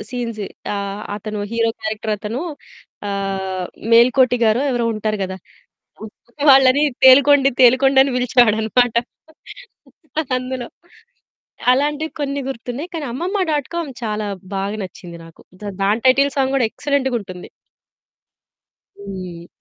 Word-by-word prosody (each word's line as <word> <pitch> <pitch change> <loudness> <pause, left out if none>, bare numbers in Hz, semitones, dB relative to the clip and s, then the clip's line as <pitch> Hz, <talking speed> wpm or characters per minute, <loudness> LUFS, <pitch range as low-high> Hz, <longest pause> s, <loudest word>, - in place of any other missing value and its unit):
Scenes 230 -5 -4 0.3
ఆ! - - -2 0.4
అతను 210 0 -5
hero 230 0 +1
క్యారెక్టరతను 215 +2 -3 0.7
ఆహ్, 190 -2 -3 0.3
'మేల్కోటి' 250 +1 +5
గారో 220 +5 +2
ఎవరో 240 -2 0
ఉంటారు 215 0 -2
కదా! 190 0 -6 1.2
వాళ్ళని 270 +2 +5 0.2
తేలుకొండి 275 +1 +7
తేలుకొండి 265 +2 +5
అని 270 0 +2
పిలిచేవాడన్నమాట 240 -1 +2 1.4
అందులో 255 -1 -5 1.0
అలాంటివి 295 +4 0
కొన్ని 280 -1 -2
గుర్తున్నాయి 270 +5 -6
కానీ 315 -3 -4
అమ్మమ్మ 365 - -2
డాట్ 290 -3 -1
కామ్ 340 -4 -3
చాలా 210 -1 -2 0.3
బాగ 195 +1 -2
నచ్చింది 175 -2 -10
నాకు. 165 - -17 0.4
దాని 205 +4 +1
టైటిల్ 275 +2 +5
సాంగ్ 270 0 +1
కూడా 250 - +2
ఎక్సలెంట్‌గుంటుంది. 245 -10 -2 1.5
హ్మ్. 185 -4 -8
245 Hz, 105 wpm, -19 LUFS, 210-270 Hz, 1.5 s, తేలుకొండి